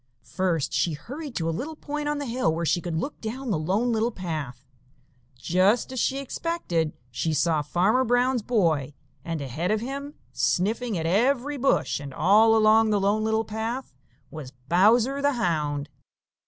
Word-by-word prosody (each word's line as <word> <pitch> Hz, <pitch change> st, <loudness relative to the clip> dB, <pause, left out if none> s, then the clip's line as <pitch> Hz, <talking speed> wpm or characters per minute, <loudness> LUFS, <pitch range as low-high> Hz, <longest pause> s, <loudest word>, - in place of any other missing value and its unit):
First 170 Hz, -6 st, 0 dB
she 145 Hz, +5 st, +1 dB
hurried 275 Hz, -, -8 dB
to 165 Hz, -, -1 dB
a -, -, +1 dB
little 295 Hz, -, -5 dB
point 295 Hz, 0 st, -4 dB
on 295 Hz, -, -1 dB
the 285 Hz, -, -4 dB
hill 240 Hz, -8 st, 0 dB
where 170 Hz, +1 st, -2 dB
she 175 Hz, +2 st, +1 dB
could 170 Hz, -2 st, -4 dB
look 280 Hz, -, -4 dB
down 240 Hz, +3 st, -4 dB
the 165 Hz, -, 0 dB
Lone 200 Hz, +10 st, 0 dB
Little 225 Hz, +1 st, +1 dB
Path. 155 Hz, -, -6 dB, 0.7 s
Just 185 Hz, -, +2 dB
as 260 Hz, -, -3 dB
she 265 Hz, -, +1 dB
expected, 270 Hz, -, -2 dB, 0.2 s
she 155 Hz, +6 st, -1 dB
saw 155 Hz, +1 st, +2 dB
Farmer 190 Hz, -, +2 dB
Brown's 245 Hz, +1 st, +2 dB
boy, 160 Hz, -, 0 dB, 0.3 s
and 165 Hz, -2 st, -4 dB
ahead 145 Hz, +7 st, -3 dB
of 215 Hz, 0 st, +1 dB
him, 280 Hz, +5 st, -6 dB, 0.2 s
sniffing 220 Hz, +3 st, 0 dB
at 160 Hz, -, -3 dB
every 255 Hz, -, +1 dB
bush 270 Hz, -, +1 dB
and 140 Hz, -2 st, -8 dB
all 215 Hz, +6 st, +5 dB
along 220 Hz, 0 st, +5 dB
the 210 Hz, -1 st, +2 dB
Lone 205 Hz, +2 st, +1 dB
Little 220 Hz, 0 st, 0 dB
Path, 220 Hz, -, -4 dB, 0.4 s
was 140 Hz, -4 st, -8 dB
Bowser 230 Hz, +10 st, +3 dB
the 285 Hz, 0 st, +2 dB
Hound. 150 Hz, -, -1 dB
215 Hz, 170 wpm, -25 LUFS, 165-250 Hz, 0.7 s, all